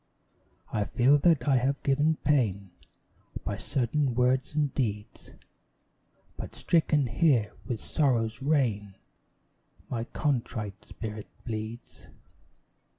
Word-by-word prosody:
I 105 Hz, -1 st, +1 dB
feel 135 Hz, +6 st, +4 dB
that 150 Hz, -5 st, +3 dB
I 135 Hz, -2 st, +5 dB
have 135 Hz, +3 st, 0 dB
given 150 Hz, +3 st, +3 dB
pain 105 Hz, -10 st, +1 dB, 0.7 s
By 100 Hz, -, -2 dB
certain 125 Hz, +3 st, 0 dB
words 130 Hz, +3 st, +1 dB
and 145 Hz, -3 st, +1 dB
deeds, 105 Hz, -5 st, -3 dB, 1.0 s
But -, -, -7 dB
stricken 155 Hz, -4 st, +2 dB
here 120 Hz, -4 st, +2 dB, 0.2 s
with 120 Hz, -4 st, -2 dB
Sorrow's 115 Hz, -6 st, 0 dB
rain, 115 Hz, -9 st, 0 dB, 1.0 s
My 115 Hz, -2 st, -2 dB
contrite 115 Hz, -8 st, -2 dB
spirit 110 Hz, -1 st, -7 dB, 0.2 s
bleeds. 110 Hz, 0 st, -6 dB
125 Hz, 100 wpm, -28 LUFS, 110-140 Hz, 1.0 s, I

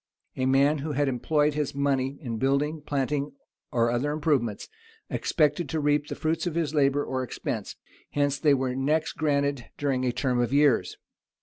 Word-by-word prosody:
A 130 Hz, 0 st, 0 dB
man 140 Hz, +3 st, +3 dB
who 150 Hz, +2 st, -3 dB
had 145 Hz, +1 st, +1 dB
employed 150 Hz, +4 st, +1 dB
his 150 Hz, -2 st, -2 dB
money 140 Hz, -1 st, 0 dB
in 120 Hz, -6 st, -4 dB
building, 145 Hz, +4 st, +1 dB
planting, 145 Hz, 0 st, -1 dB, 0.4 s
or 115 Hz, -1 st, +2 dB
other 125 Hz, +5 st, 0 dB
improvements, 145 Hz, -8 st, 0 dB, 0.4 s
expected 150 Hz, 0 st, +1 dB
to 160 Hz, -, -1 dB
reap 145 Hz, 0 st, +1 dB
the 145 Hz, -, -5 dB
fruits 160 Hz, +3 st, -1 dB
of 165 Hz, -, -3 dB
his 160 Hz, -3 st, -1 dB
labor 145 Hz, -1 st, +2 dB
or 130 Hz, 0 st, -2 dB
expense: 125 Hz, -, -4 dB, 0.3 s
hence 145 Hz, -1 st, 0 dB
they 145 Hz, -2 st, +4 dB
were 130 Hz, -1 st, -1 dB
next 150 Hz, +4 st, 0 dB
granted 140 Hz, -4 st, 0 dB
during 135 Hz, -3 st, 0 dB
a 125 Hz, -, +1 dB
term 125 Hz, 0 st, 0 dB
of 120 Hz, -1 st, +1 dB
years. 140 Hz, -3 st, +3 dB
140 Hz, 175 wpm, -27 LUFS, 130-150 Hz, 0.4 s, they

